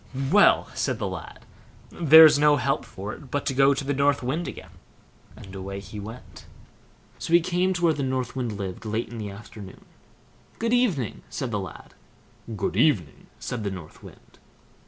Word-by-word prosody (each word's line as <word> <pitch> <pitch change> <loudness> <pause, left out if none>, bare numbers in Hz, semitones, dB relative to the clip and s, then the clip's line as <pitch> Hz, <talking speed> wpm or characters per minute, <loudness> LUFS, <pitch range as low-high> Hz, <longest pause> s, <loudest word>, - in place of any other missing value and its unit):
"Well", 205 +2 +5
said - - -1
the - - -3
lad, - - -8 0.5
"there's 160 -2 +8
no 150 0 +5
help 135 +1 -1
for 100 +2 -7
it 140 - -12
but 145 +1 -2
to - - 0
go 135 +1 +4
to 140 - -3
the 145 - 0
North 140 0 +1
Wind 150 +8 -2
again"; - - -9 0.6
and 95 - -12
away 95 0 -6
he 100 +2 -9
went. 110 +5 -11 0.7
So 165 - -4
he 170 - +8
came 180 +2 0
to 175 -1 -4
where 165 -2 +4
the 150 - -4
North 130 -2 -2
Wind 120 -4 -3
lived 95 -1 -6
late 110 +1 -3
in 120 - -8
the 105 -2 -5
afternoon. 100 -1 -12 0.7
"Good 230 +1 -1
evening!" 195 - 0
said 130 -4 -4
the 105 - -1
lad. 95 -7 -9 0.6
"Good 95 - -2
evening!" 105 - +1
said 120 -3 -5
the 100 - -1
North 90 -5 -10
Wind. - - -16
130 Hz, 180 wpm, -25 LUFS, 105-150 Hz, 0.7 s, there's